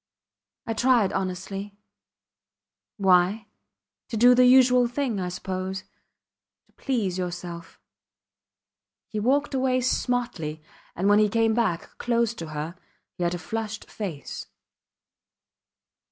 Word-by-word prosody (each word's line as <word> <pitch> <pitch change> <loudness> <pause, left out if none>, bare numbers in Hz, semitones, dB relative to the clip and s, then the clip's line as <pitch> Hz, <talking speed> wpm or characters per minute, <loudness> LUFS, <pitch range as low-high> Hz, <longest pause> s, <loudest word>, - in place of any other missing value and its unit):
I 225 - -2
tried 240 -3 +3
honestly.... 195 +2 -4 1.2
Why?... 190 +2 +3 0.6
To 230 - -3
do 245 +3 +7
the 250 0 +6
usual 250 -1 +6
thing 245 -4 -2
I 180 -1 -2
suppose.... 185 +1 -4 0.8
To - - -33
please 210 -9 -1
yourself. 175 -2 -6 1.3
He 215 - -3
walked 275 +7 +1
away 260 -1 +2
smartly, 240 -11 -1 0.4
and 190 +3 0
when 205 +1 +6
he 210 -1 +4
came 225 +1 +2
back, 215 -7 -1
close 235 -1 +1
to 165 -7 -7
her, 155 +2 -5 0.4
he 180 - -4
had 175 0 0
a - - -3
flushed 220 +5 -5
face. 175 -10 -6
210 Hz, 115 wpm, -25 LUFS, 180-245 Hz, 1.3 s, do